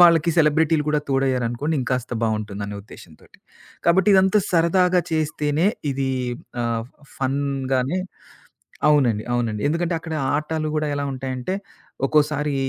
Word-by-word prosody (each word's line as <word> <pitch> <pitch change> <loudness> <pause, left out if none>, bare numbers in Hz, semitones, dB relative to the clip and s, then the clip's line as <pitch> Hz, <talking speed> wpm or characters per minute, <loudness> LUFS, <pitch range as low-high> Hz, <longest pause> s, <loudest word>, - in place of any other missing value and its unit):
వాళ్ళకి 170 -1 +6
సెలబ్రిటీలు 155 0 +3
కూడా 150 0 +2
తోడయ్యారనుకోండి, 135 +2 0
ఇంకాస్త 125 -1 -2
బావుంటుందనే 105 -2 -2
ఉద్దేశంతోటి. 85 -6 -16 0.5
కాబట్టి 190 +4 +4
ఇదంతా 190 +2 +5
సరదాగా 180 +1 +3
చేస్తేనే 155 +1 0 0.3
ఇది 135 0 -1 0.5
ఆహ్, 115 0 -1 0.3
ఫన్‌గానే 135 +2 -1 0.9
అవునండి, 125 -8 +3
అవునండి. 115 -3 -1
ఎందుకంటే, 170 +2 0
అక్కడ 160 0 -5 0.2
ఆటలు 155 +1 -2
కూడా 155 0 0
ఎలా 145 0 -2
ఉంటాయంటే, 130 +5 -3 0.5
ఒక్కోసారి 150 -1 +1
145 Hz, 110 wpm, -22 LUFS, 125-160 Hz, 0.9 s, వాళ్ళకి